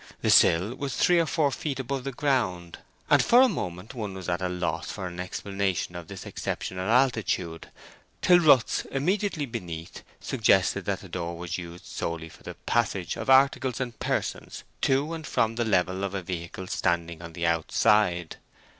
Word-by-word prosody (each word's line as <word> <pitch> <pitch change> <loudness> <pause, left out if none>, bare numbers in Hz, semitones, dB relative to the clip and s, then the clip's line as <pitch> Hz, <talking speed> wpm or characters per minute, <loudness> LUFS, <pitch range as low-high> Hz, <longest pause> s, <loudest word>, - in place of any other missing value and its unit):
The - - +3
sill 90 +8 +5
was 140 -3 -3
three 175 -1 +4
or 165 - +1
four 155 -4 +1
feet 135 +1 -4
above 135 0 -3
the 135 - -2
ground, 115 - -1 0.3
and - - +5
for 245 +2 +6
a - - +6
moment 90 - -5
one 105 -6 -5
was 95 -2 -7
at 90 +1 -1
a 90 - -1
loss 85 -3 -2
for 95 - -5
an 90 -1 -6
explanation 95 -1 -2
of 85 -2 -7
this - - -9
exceptional 95 +2 -4
altitude, 110 -9 +1 0.5
till 180 -1 +6
ruts 140 -9 +4
immediately 175 +2 -1
beneath 85 -9 -7 0.2
suggested 100 -6 +2
that 95 -1 -2
the 95 - -11
door 85 -1 -4
was 85 0 -4
used 85 0 -9
solely 80 -1 -4
for - - -17
the - - -8
passage 100 -7 -1
of - - -5
articles 130 -2 +4
and 120 -3 -4
persons - - -3 0.2
to 140 +4 +1
and 160 -2 -6
from 115 0 +1
the 120 +1 -1
level 95 -2 +1
of 100 0 -2
a 95 - -3
vehicle 85 +1 -5
standing 85 -2 -1
on 85 -1 -9
the 85 0 -3
outside. 85 +2 +2
95 Hz, 180 wpm, -27 LUFS, 85-130 Hz, 0.5 s, for